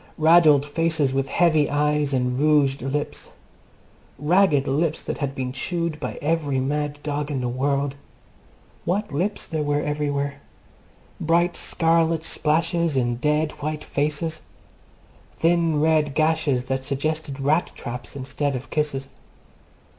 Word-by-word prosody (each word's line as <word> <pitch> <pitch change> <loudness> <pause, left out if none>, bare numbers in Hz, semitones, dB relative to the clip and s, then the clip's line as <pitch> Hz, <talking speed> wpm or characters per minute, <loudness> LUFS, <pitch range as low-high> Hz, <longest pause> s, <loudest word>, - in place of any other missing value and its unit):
Raddled 155 -3 +6
faces 160 -2 0
with 135 0 -1
heavy 155 -4 +3
eyes 150 0 +1
and 125 -1 0
rouged 145 -2 +3
lips. 140 +3 -3 0.9
Ragged 150 -2 +3
lips 150 +3 0
that - - -4
had 140 -2 -2
been 130 -1 -3
chewed 170 +2 -3
by - - -5
every 145 -3 0
mad 145 +2 -1
dog 145 0 -2
in 140 -3 -2
the 125 - -2
world. 140 +2 0 0.9
What 200 +1 -1
lips 185 +9 -1
there 160 -2 -3
were 145 0 0
everywhere! 145 -1 -2 0.8
Bright 170 +2 +2
scarlet 165 -1 +1
splashes 165 0 0
in 120 -2 0
dead 150 +3 +1
white 150 0 -3
faces. 155 +2 -2 1.0
Thin 165 -2 +2
red 155 -2 +2
gashes 155 -5 +1
that 130 0 -2
suggested 140 +1 -2
rat 150 +5 +1
traps 120 +3 -7
instead 140 +1 -2
of 130 +1 -7
kisses. 145 -3 -1
150 Hz, 130 wpm, -23 LUFS, 140-160 Hz, 1.0 s, Raddled